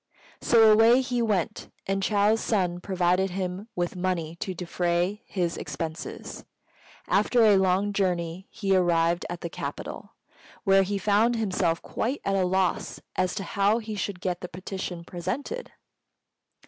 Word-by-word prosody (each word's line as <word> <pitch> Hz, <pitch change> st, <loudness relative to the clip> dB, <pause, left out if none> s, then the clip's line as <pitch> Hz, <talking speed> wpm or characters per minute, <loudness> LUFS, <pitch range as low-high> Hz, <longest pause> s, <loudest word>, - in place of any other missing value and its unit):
So 225 Hz, -2 st, +6 dB
away 225 Hz, +4 st, +6 dB
he 250 Hz, -2 st, -1 dB
went, 205 Hz, -7 st, -1 dB, 0.2 s
and 195 Hz, 0 st, -1 dB
Chou's 210 Hz, +2 st, +3 dB
son 180 Hz, -5 st, 0 dB
provided 185 Hz, 0 st, +1 dB
him 185 Hz, +3 st, -4 dB
with 175 Hz, 0 st, -2 dB
money 175 Hz, -3 st, -2 dB
to 185 Hz, +1 st, -4 dB
defray 175 Hz, +3 st, -1 dB
his 175 Hz, -3 st, -1 dB
expenses. 155 Hz, +3 st, -6 dB, 0.6 s
After 240 Hz, -2 st, +3 dB
a 210 Hz, -2 st, +6 dB
long 190 Hz, +2 st, +2 dB
journey 180 Hz, -2 st, -1 dB
he 195 Hz, -2 st, 0 dB
arrived 170 Hz, -1 st, +2 dB
at 175 Hz, 0 st, -5 dB
the -, -, -3 dB
capital, -, -, -6 dB, 0.5 s
where 195 Hz, -1 st, +5 dB
he 200 Hz, +1 st, -1 dB
found 210 Hz, +4 st, +3 dB
himself 185 Hz, -6 st, 0 dB
quite 260 Hz, +6 st, -2 dB
at 195 Hz, -, +1 dB
a 190 Hz, -1 st, +2 dB
loss 185 Hz, 0 st, 0 dB, 0.2 s
as 185 Hz, +1 st, 0 dB
to 200 Hz, -, -3 dB
how 200 Hz, +3 st, +2 dB
he 220 Hz, -2 st, -5 dB
should 200 Hz, -2 st, -4 dB
get 180 Hz, -2 st, -2 dB
the 180 Hz, -, -6 dB
petition 180 Hz, -1 st, -6 dB
presented. 275 Hz, -, -5 dB
190 Hz, 150 wpm, -26 LUFS, 175-210 Hz, 0.6 s, So